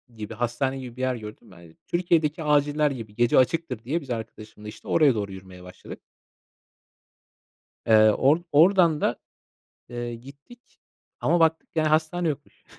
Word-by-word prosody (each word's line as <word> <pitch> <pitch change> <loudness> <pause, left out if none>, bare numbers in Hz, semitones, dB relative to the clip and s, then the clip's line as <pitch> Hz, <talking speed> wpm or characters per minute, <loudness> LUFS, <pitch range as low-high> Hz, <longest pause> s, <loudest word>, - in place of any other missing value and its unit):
gibi, 110 0 -7
hastane 120 +4 -2
gibi, 125 -2 -9
bir - - -6
yer 130 -1 0
gördüm 105 -3 -11
ben. 85 -2 -16
Türkiye'deki 165 -3 0
aciller 150 0 +2
gibi; 115 -6 -8
gece 120 +1 +2
açıktır 130 -3 0
diye, 150 +8 -2
biz 140 - -14
arkadaşımla 110 -2 -8
işte 105 - -11
oraya 145 -6 +3
doğru 100 -2 -4
yürümeye 95 -1 -12
başladık. 90 0 -11 1.9
Eee, 110 -1 +6
or 135 +8 +3
oradan 165 0 +4
da, - - 0 0.7
eee, 120 -1 -5
gittik 140 - -16 0.4
ama 175 - +1
baktık, 160 0 +2
yani 155 -1 +1
hastane 160 +3 0
yokmuş. 145 -1 -7
130 Hz, 145 wpm, -24 LUFS, 110-155 Hz, 1.9 s, Eee